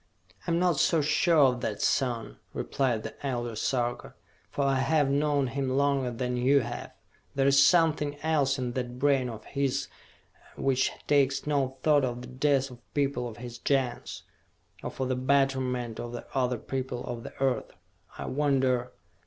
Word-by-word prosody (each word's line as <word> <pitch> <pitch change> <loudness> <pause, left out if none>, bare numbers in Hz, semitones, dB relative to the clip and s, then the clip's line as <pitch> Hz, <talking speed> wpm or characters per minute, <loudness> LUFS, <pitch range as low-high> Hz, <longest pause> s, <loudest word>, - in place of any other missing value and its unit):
"I - - 0
am 170 - +2
not 175 -4 +2
so 165 - +3
sure 160 +3 +3
of 125 -2 +1
that, 105 -2 -3
son!" 120 -4 0 0.2
replied 125 -5 -1
the - - -9
Elder 120 -4 -2
Sarka. 120 +1 -2 0.3
"For 140 - -2
I 135 -1 +2
have 145 0 +2
known 145 -1 +2
him 135 +1 -2
longer 140 -1 +1
than 125 +1 -2
you 135 +3 +4
have! 120 0 -6 0.4
There's 140 0 +5
something 155 -3 +3
else 145 -4 +2
in 125 -2 -2
that 125 0 -4
brain 135 -2 +2
of 110 -2 -8
his 140 -1 -1 0.7
which 130 -1 +1
takes 140 -1 +2
no 135 -3 0
thought 150 -2 +4
of 125 -1 -2
the - - -8
death 135 +1 +1
of 120 0 -16
people 140 -4 0
of 110 - -11
his 120 -1 -8
Gens 135 -4 -1 0.6
or - - -4
for 130 - -3
the 130 0 0
betterment 130 -3 0
of 120 0 -5
the 120 - -6
other 125 -2 +1
people 130 +1 -4
of 120 -1 -5
the - - -9
Earth! 135 -2 0 0.5
I - - -5
wonder...." 130 -3 +1
130 Hz, 170 wpm, -28 LUFS, 125-140 Hz, 0.7 s, There's